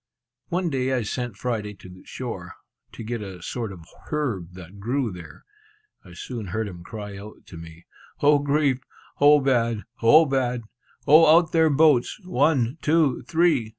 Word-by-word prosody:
One 175 -1 -1
day 130 -1 -1
I 125 -3 0
sent 120 +1 -4
Friday 105 -4 -3
to 95 - -14
the 90 0 -14
shore, - - -7 0.4
to - - -8
get 115 0 -4
a 95 -4 -9
sort 115 0 -4
of 85 -4 -12 0.2
herb 115 - -3
that 90 +2 -12
grew 120 +3 -1
there. 90 -2 -12 0.6
I - - -14
soon 115 -6 -7
heard 110 +4 -3
him 90 -3 -10
cry 105 0 -8
out 105 +2 -12
to 85 - -12
me, 80 0 -12 0.3
"O 145 0 +4
grief! 140 -2 +1 0.4
O 145 +1 +6
bad! 115 -5 0 0.2
O 150 +8 +6
bad! 125 -4 -1 0.4
O 155 +2 +7
out 170 -2 +1
there 160 -1 +4
boats, 150 - +3
one, 145 -4 +1
two, 155 -4 +2
three!" 160 -9 +2
125 Hz, 165 wpm, -24 LUFS, 105-145 Hz, 0.6 s, O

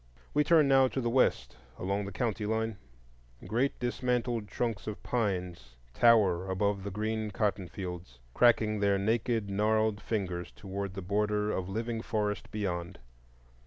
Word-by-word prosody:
We 150 - +4
turn 155 -1 +5
now 135 -1 +5
to 130 - -3
the 120 -2 0
west 65 - +2 0.2
along 100 +2 -1
the 100 - -6
county 110 +1 -2
line. 110 -1 -1 0.7
Great 125 +5 0
dismantled 120 -2 -1
trunks 110 -1 -3
of 105 - -5
pines 90 - -2 0.2
tower 95 - +4
above 100 +1 0
the 100 - -3
green 110 +2 -2
cottonfields, 90 - -3 0.2
cracking 110 -3 +4
their 100 -1 +3
naked 110 +1 0
gnarled 110 +1 +1
fingers 90 -5 -3
toward 100 0 -5
the 95 - -5
border 105 +2 0
of 95 0 -3
living 115 +2 -2
forest 105 -3 -2
beyond. 90 -4 -3
105 Hz, 140 wpm, -30 LUFS, 95-115 Hz, 0.7 s, turn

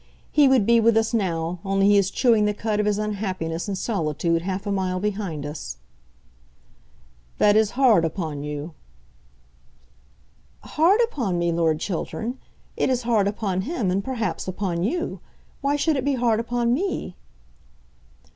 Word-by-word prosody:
He 295 -2 +5
would 260 -6 +4
be 235 +1 +5
with 230 0 +4
us 225 +1 +1
now, 175 -5 -1
only 195 0 +1
he 205 - +5
is 200 -1 +3
chewing 225 -3 +3
the 210 0 0
cud 210 0 -1
of 210 - +1
his 205 -1 +1
unhappiness 190 -5 -3
in 195 - -2
solitude 165 -4 -1
half 190 +3 -4
a 205 - -2
mile 185 -2 -1
behind 195 -7 -3
us." 145 - -6 1.6
"That 205 0 +4
is 220 +2 +2
hard 240 -10 +5
upon 160 -3 -3
you." 150 +2 -5 1.9
"Hard 360 +9 +3
upon 240 - -1
me, 170 0 +1
Lord 165 -2 +1
Chiltern! 220 +8 -4 0.4
It - - 0
is 250 -1 0
hard 225 -4 +2
upon 200 -3 -1
him, 230 - -2
and, 195 +2 0
perhaps, 235 -6 -3
upon 185 -2 -2
you. 335 - -2 0.4
Why 280 +1 +1
should 305 +1 +1
it 265 - -1
be 280 0 +1
hard 235 -3 +1
upon 235 0 0
me?" 305 - -2
205 Hz, 155 wpm, -23 LUFS, 180-235 Hz, 1.9 s, He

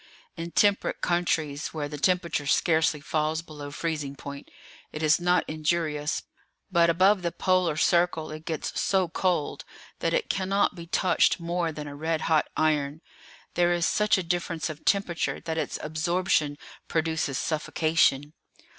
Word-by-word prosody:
In 165 -1 -5
temperate 205 +3 +2
countries, 160 -4 -1
where 150 -2 -2
the 150 0 -7
temperature 170 -4 +1
scarcely 160 -1 +2
falls 155 +2 -1
below 150 -3 -8
freezing 150 -2 -3
point, 140 0 -9 0.4
it 155 - -5
is 155 +2 +4
not 180 +1 +2
injurious; 155 -1 -1 0.5
but 170 -2 +4
above 190 +4 +4
the 170 -1 -1
Polar 180 -4 +1
circle 165 -1 +2
it 155 0 -8
gets 160 -2 -3
so 190 -2 +2
cold 170 -2 -1 0.4
that - - 0
it - - 0
cannot 195 +1 +1
be 170 -2 -10
touched 180 +1 +2
more 170 0 -1
than 150 -1 -7
a 145 - -7
red 160 +2 -1
hot 160 -2 +2
iron; 150 -1 +1 0.5
there 175 0 +3
is 175 -1 +1
such 210 -1 +3
a 190 - -1
difference 170 -1 -2
of 155 - -12
temperature 195 -4 0
that 160 -1 -3
its - - -2
absorption 155 -1 0 0.3
produces 160 -4 -1
suffocation. 155 -2 +1
160 Hz, 150 wpm, -27 LUFS, 155-175 Hz, 0.5 s, is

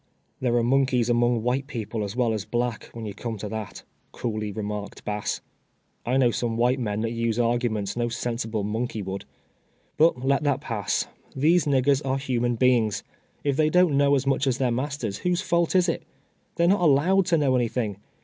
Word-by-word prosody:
" - - -44
There 120 -2 +1
are 120 - +3
monkeys 125 -1 +2
among 120 -1 +2
white 130 +3 0
people 115 -5 -4
as 100 +1 -5
well 120 -3 +1
as 105 -3 -2
black, 120 -1 -2
when 115 -1 -7
you 105 - -5
come 115 +2 -5
to 105 - -5
that," 110 -2 -6 0.3
coolly 110 -3 -3
remarked 105 -1 -5
Bass. 105 0 -2 0.3
" - - -44
I 125 +2 +2
know 125 -3 +4
some 115 -1 -2
white 125 +3 +2
meii 105 -2 -2
that 115 - -1
use 115 -1 -1
arguments 115 -4 0
no 120 0 0
sensible 115 -2 -2
monkey 110 +1 -2
would. 95 +1 -5 0.7
But 150 -5 +3
let 140 0 +3
that 145 -3 +1
pass. 105 -5 -1 0.3
These 160 +4 +3
niggers 140 0 +2
are 135 0 0
human 120 -3 0
beings. 115 -3 +2 0.4
If 140 -2 0
they 155 -1 +3
don't 180 -3 +4
know 140 0 +4
as 135 0 0
much 135 0 +1
as 130 -2 +1
their 130 -2 +1
masters, 130 -4 -3
w 180 - 0
hose 175 - 0
fault 170 +1 +1
is 180 -1 +4
it? 165 - -1 0.5
They 170 - +1
are - - +5
not 205 - -4
allowed 175 +5 +4
to 170 - +3
know 140 -4 +2
anything. 115 -4 -1
120 Hz, 205 wpm, -25 LUFS, 110-140 Hz, 0.7 s, are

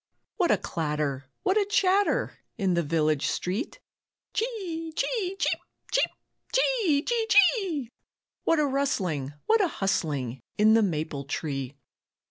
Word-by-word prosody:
What 360 -5 +2
a - - +5
clatter, 150 -4 -2 0.2
what 385 +3 +3
a 410 - +2
chatter 405 +5 +2 0.2
In 195 -4 +1
the 170 - +2
village 155 -2 +1
street. 205 - -2 0.5
"Chee, 380 -9 -3
chee, 390 -6 -1
cheep, - - 0 0.3
cheep, - - +3 0.4
chee, 445 -13 +2
chee, 465 -2 0
chee!" 375 - +3 0.5
What 330 - +3
a 300 - +3
rustling, 190 - -1
what 445 0 +4
a - - +3
hustling 145 - -1 0.2
In 215 +1 +6
the 225 - +5
maple 155 -7 -2
tree. 135 -2 -3
260 Hz, 130 wpm, -27 LUFS, -, 0.5 s, In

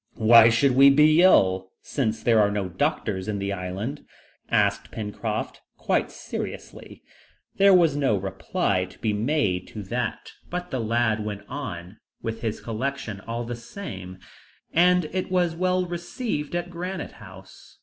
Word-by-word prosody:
"Why 115 0 +7
should 115 +4 +3
we 135 +1 +8
be 150 +3 +5
ill, 95 - +4
since 115 -6 -2
there 115 -2 +4
are 100 - +3
no 100 -2 -2
doctors 100 - -1
in 105 -1 -2
the 100 0 -2
island?" 100 +9 -5 0.5
asked 100 -2 +1
Pencroft 105 -2 -4 0.2
quite - - 0
seriously. - - -8 0.5
There 195 -1 +6
was 165 -5 +4
no 135 -7 +2
reply 95 - -1
to 95 - -16
be 110 -2 -1
made 105 -5 0
to 105 - -8
that, 115 +3 -4 0.2
but 180 0 -5
the 130 - -2
lad 110 -1 +1
went 105 -1 -5
on 105 -9 -7 0.2
with 115 0 -5
his 110 -2 -3
collection 115 -2 -4
all 115 +1 -3
the 120 +1 -5
same, 100 - -8 0.6
and 180 0 +4
it 185 0 -2
was 180 -2 +1
well 185 +1 +1
received 175 - -4
at 175 0 -3
Granite 180 +2 -5
House. - - -14
115 Hz, 150 wpm, -25 LUFS, 100-160 Hz, 0.6 s, we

